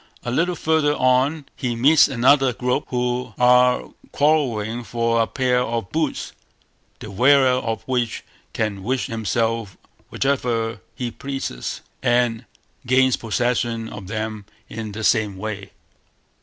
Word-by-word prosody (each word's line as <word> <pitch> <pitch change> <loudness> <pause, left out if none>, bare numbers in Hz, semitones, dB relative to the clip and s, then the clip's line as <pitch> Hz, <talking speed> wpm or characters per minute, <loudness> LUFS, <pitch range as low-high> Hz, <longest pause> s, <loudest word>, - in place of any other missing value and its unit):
A 120 - -3
little 170 +7 +1
further 155 -2 +1
on 130 +4 +2
he 120 -2 -2
meets 140 +7 +5
another 135 0 +3
group, 125 +4 -1
who 125 0 -2
are 125 0 +4 0.2
quarrelling 120 -7 +1
for 115 0 0
a 115 - +1
pair 125 -1 +1
of 115 -5 -3
boots, 155 -3 -2 0.7
the 105 - -9
wearer 130 +5 +5
of 115 -3 -4
which 125 -3 -2 0.3
can 105 -3 -2
wish 125 +6 -1
himself 115 -2 -2 0.3
whithersoever 120 -5 -1
he 125 -3 -4
pleases, 135 - -5 0.2
and 120 -1 +1 0.4
gains 130 0 +4
possession 115 0 -1
of 100 -3 -9
them 110 -1 -4 0.2
in 110 -1 -6
the 110 +2 -6
same 105 -3 +2
way. 100 -1 -5
120 Hz, 130 wpm, -22 LUFS, 110-130 Hz, 0.7 s, meets